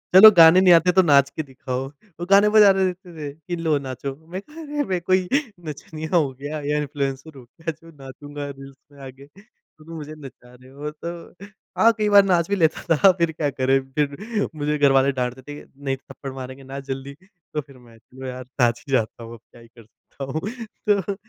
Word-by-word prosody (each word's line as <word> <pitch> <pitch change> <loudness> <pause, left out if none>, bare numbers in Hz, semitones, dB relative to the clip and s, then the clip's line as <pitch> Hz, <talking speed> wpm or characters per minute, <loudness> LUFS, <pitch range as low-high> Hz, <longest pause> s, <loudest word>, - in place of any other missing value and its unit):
"चलो, 215 +3 +11
गाने 165 +2 +8
नहीं 180 -2 +7
आते, 170 +2 +5
तो 190 - +5
नाच 140 -5 +4
के 155 +3 -5
दिखाओ।" 130 -1 -5 0.3
वो 175 - -4
गाने 200 +1 +6
बजा 210 -2 +7
दे 190 0 +1
देते 180 -1 -5 0.2
थे - - -16
कि, 160 +4 -6
"लो, 160 -3 0
नाचो।" 135 0 -6
मैंने 165 +5 -8
कहा, 300 +9 -13
"अरे! 295 -1 -3
मैं 185 -8 -2
कोई 185 +1 +1 0.4
नचनिया 155 +3 -6
हूँ 145 -6 +2
क्या, 145 +2 -5
या 145 +1 -1
इन्फ्लुएंसर 140 0 -4
हूँ 125 - -13
क्या, 160 +6 -6
जो 165 +2 -17
नाचूँगा 145 +2 -8
रील्स 135 -1 -11
में 140 - -18
आके, 130 +1 -13
जो 200 -6 -22
तुम 165 +1 -9
मुझे 155 -1 -8
नचा 125 -1 -14
रहे 130 +1 -17
हो?" 145 +2 -7
तो 170 +4 -9 0.3
हाँ, 230 - +6
कई 210 -1 +1
बार 200 -1 +7
नाच 175 -3 +1
भी 200 - +1
लेता 165 -1 +1
था। 190 +6 +6
फिर 170 -2 +1
क्या 155 -2 -2
करें, 135 0 +1
फिर? 150 - -2
मुझे 150 0 -1
घर 145 -1 +4
वाले 135 +1 +4
डाँटते 125 +1 -3
थे 145 +3 -10
कि, - - -20
"नहीं 135 -1 -1
तो - - -15
थप्पड़ 135 - -8
मारेंगे, 130 +1 -9
नाच 135 +1 -8
जल्दी।" 135 +1 -5 0.4
तो 150 - -1
फिर 140 -2 -18
मैं, 120 -2 -18 0.2
"लो 130 0 -8
यार, 130 0 -6 0.2
नाच 120 -1 +2
ही - - -8
जाता 115 -1 -1
हूँ। 115 0 -9
अब 115 - -12
क्या 120 - -17
ही 115 - -16
कर 115 0 -18
सकता 115 +5 -13
हूँ? 135 +4 -4 0.5
तो 200 -1 +1
150 Hz, 225 wpm, -22 LUFS, 135-175 Hz, 0.5 s, चलो